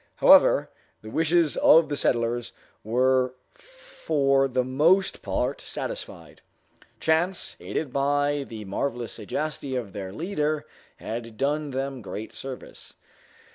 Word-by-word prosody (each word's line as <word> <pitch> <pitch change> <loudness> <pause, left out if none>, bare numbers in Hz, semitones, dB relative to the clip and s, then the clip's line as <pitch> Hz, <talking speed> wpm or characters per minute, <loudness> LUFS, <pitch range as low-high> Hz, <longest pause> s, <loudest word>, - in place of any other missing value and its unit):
However, - - +6 0.3
the 110 - -9
wishes 165 +1 +2
of 165 -1 +6
the 145 - -1
settlers 120 -2 0 0.3
were 130 +3 +2 0.2
for 165 - 0
the 125 -1 0
most 155 +10 +2
part - - -2
satisfied. - - -7 0.6
Chance, 170 +4 0
aided 145 -5 -4
by 145 +1 +1
the 110 -2 -7
marvelous 120 +4 -3
sagacity 140 +4 -4
of 115 -6 -4
their 95 -2 -6
leader, 155 - -2 0.3
had 115 -1 -6
done 145 +3 0
them 135 -1 -4
great 105 +2 -7
service. 135 -1 -9
135 Hz, 115 wpm, -26 LUFS, 120-155 Hz, 0.6 s, However